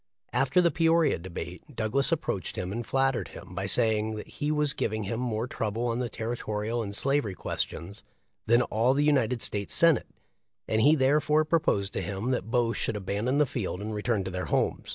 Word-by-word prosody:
After 140 +6 +3
the 170 -1 +3
Peoria 165 - +3
debate 90 - -8
Douglas 115 +7 +1
approached 150 - -2
him 90 0 -3
and 120 +3 -3
flattered 135 0 0
him - - -11
by 95 +1 -3
say 110 +3 +2
ing 110 +1 -3
that 105 - -7
he 145 - -3
was 150 -1 +2
giving 110 0 -2
him 115 +4 -3
more 115 -2 -1
trouble 115 -1 -2
on 120 0 -1
the 125 -1 -2
territorial 110 0 -3
and 100 -2 -4
slaver}' 135 -6 +1
questions 100 +5 -4 0.5
than 120 +2 +5
all 120 +4 +2
the 145 - +2
United 130 -5 +2
States 100 -1 -2
Senate, 165 -6 +4 0.6
and 110 0 +1
he 150 +7 +6
therefore 150 +2 +3
proposed 155 - +1
to - - -2
him 100 +7 -3
that 125 -3 -2
both 115 -1 +1
should - - -1
abandon 105 +6 -1
the 150 - +4
field 110 -8 -3
and 105 +2 -4
return 105 -1 0
to 95 - -5
their 90 0 -3
homes. - - -1
115 Hz, 195 wpm, -28 LUFS, 105-135 Hz, 0.6 s, he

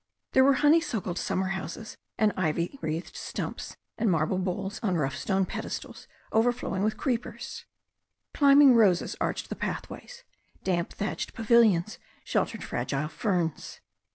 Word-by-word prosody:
There 260 - +5
were 275 +1 +6
honeysuckled 270 - +2
summer 190 0 -1
houses 195 +3 -5 0.2
and 215 -1 +3
ivy 170 - -1
wreathed 160 +2 -4
stumps, - - -5 0.2
and 225 -1 +2
marble 165 +2 +1
bowls 190 +2 -3
on 195 -6 0
rough 135 -5 0
stone 195 -1 0
pedestals - - -6 0.2
overflowing 225 -4 +1
with 215 +1 0
creepers. 245 -4 -3 0.7
Climbing 280 -1 +7
roses 205 -7 +3
arched - - -2
the - - -4
pathways; - - -6 0.4
damp 175 -2 0
thatched 205 - -4
pavilions 220 -4 +3 0.2
sheltered - - -1
fragile 150 +2 -2
ferns. 175 -5 -2
200 Hz, 125 wpm, -28 LUFS, 175-235 Hz, 0.7 s, Climbing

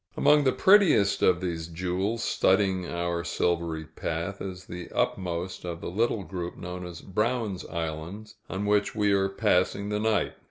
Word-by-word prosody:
Among 150 -1 +5
the 130 - +5
prettiest 155 - +5
of 90 -1 +4
these 85 -3 -3
jewels 95 +7 -2
studding 95 -2 +2
our 85 0 -2
silvery 85 -3 -1
path, 85 +4 -4
is 90 -1 -6
the 90 -1 -8
upmost 90 0 -2
of 85 -2 -5
the - - -5
little 110 +1 0
group 90 0 -5
known 90 0 -6
as 85 -1 -9
Brown's 105 -1 -1
Islands, 85 +6 -5 0.2
on 95 +2 -3
which 105 0 +1
we 105 -1 +2
are 95 0 +2
passing 95 +1 +1
the 105 0 -1
night. 110 -1 +1
95 Hz, 160 wpm, -27 LUFS, 85-105 Hz, 0.2 s, Among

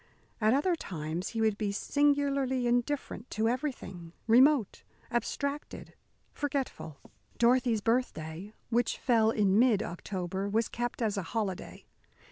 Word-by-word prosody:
At 215 +3 +4
other 340 +6 +2
times 165 - -4
he 225 - -3
would 220 -2 +1
be 210 -2 0
singularly 280 +1 +1
indifferent 245 0 -1
to 220 +1 0
everything, 230 - -4
remote, 250 0 +4 0.3
abstracted, 280 +4 -3 0.4
forgetful. 270 - -3 0.4
Dorothy's 240 -2 +3
birthday, 200 -6 -2 0.2
which 235 0 +1
fell 225 -3 +3
in 205 -2 +3
mid 230 -4 +4
October, 190 +2 -4
was 220 +3 +1
kept 240 0 -3
as 210 -2 0
a - - 0 0.2
holiday. 195 -5 -4
230 Hz, 120 wpm, -30 LUFS, 200-260 Hz, 0.4 s, At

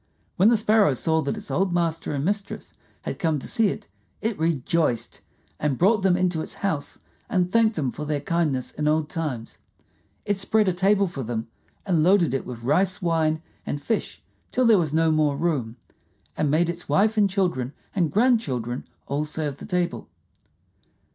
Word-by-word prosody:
When 195 +4 +5
the 235 - +4
Sparrow 215 -6 +4
saw 160 +5 +1
that 140 +8 -2
its 210 - -8
old 190 0 +1
master 165 -2 -1
and 140 0 -2
mistress 200 +1 -3 0.3
had - - -5
come 160 -3 +1
to 135 - -6
see 225 -2 +2
it, - - -4 0.3
it 220 +1 -1
rejoiced, 160 -5 0 0.4
and 145 -4 0
brought 205 +4 +3
them 185 -2 +3
into 180 -3 0
its - - -7
house 160 -8 -2 0.3
and 180 -5 +1
thanked 225 0 +3
them 135 -6 -1
for 150 - -6
their 150 -1 -1
kindness 145 -4 -1
in 150 0 -2
old 155 0 +1
times. 140 -9 -4 0.7
It 205 -1 0
spread 210 +1 +2
a 185 - +2
table 195 +3 +3
for 170 -7 -5
them, 115 -1 -4 0.4
and 175 -6 +2
loaded 175 -3 +4
it 135 - -2
with 120 -2 -7
rice 180 +8 +2
wine 160 -3 0 0.2
and 145 - -3
fish 225 +9 -3 0.3
till 255 - +2
there 225 -4 +6
was 160 -5 0
no 160 +1 +3
more 150 -2 +2
room, 140 -8 -1 0.6
and 150 - 0
made 160 +4 +3
its 170 +1 -5
wife 215 +3 +3
and 205 -2 +3
children 175 -10 0 0.2
and 170 -6 +1
grandchildren 145 - +1 0.2
all 140 +2 -1
serve 150 -2 -4
the - - -10
table. 180 -3 -2
165 Hz, 180 wpm, -24 LUFS, 145-195 Hz, 0.7 s, there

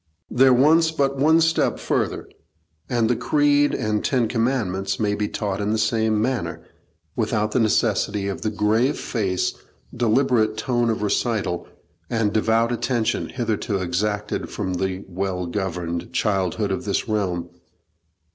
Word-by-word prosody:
There 130 +2 +5
wants 155 +6 +5
but 140 -4 0
one 160 +3 +5
step 160 0 +2
further, - - -2 0.6
and 120 -2 +2
the 120 - +2
Creed 145 +4 +2
and 105 -1 -1
Ten 125 -5 +1
Commandments 110 -5 -1
may 105 -2 +1
be 105 0 -1
taught 100 -2 -3
in 105 - -1
the 110 - +1
same 110 0 +1
manner, 120 +1 -2 0.5
without 110 -1 0
the 125 - +1
necessity 105 -2 +1
of 100 - -4
the 110 - 0
grave 110 +6 +1
face, 95 -6 -1 0.4
deliberate 115 -2 +2
tone 120 +1 0
of 110 -2 -1
recital, 105 -4 -1 0.4
and 115 -3 0
devout 115 +2 +2
attention, 120 -1 -1
hitherto 110 -4 -2
exacted 100 +3 -2
from 95 -3 -3
the 95 +1 -3
well 95 0 -3
governed 85 -2 -3
childhood 100 0 0
of 95 - -2
this 100 +2 -1
realm. 90 -6 -1
110 Hz, 140 wpm, -23 LUFS, 100-120 Hz, 0.6 s, There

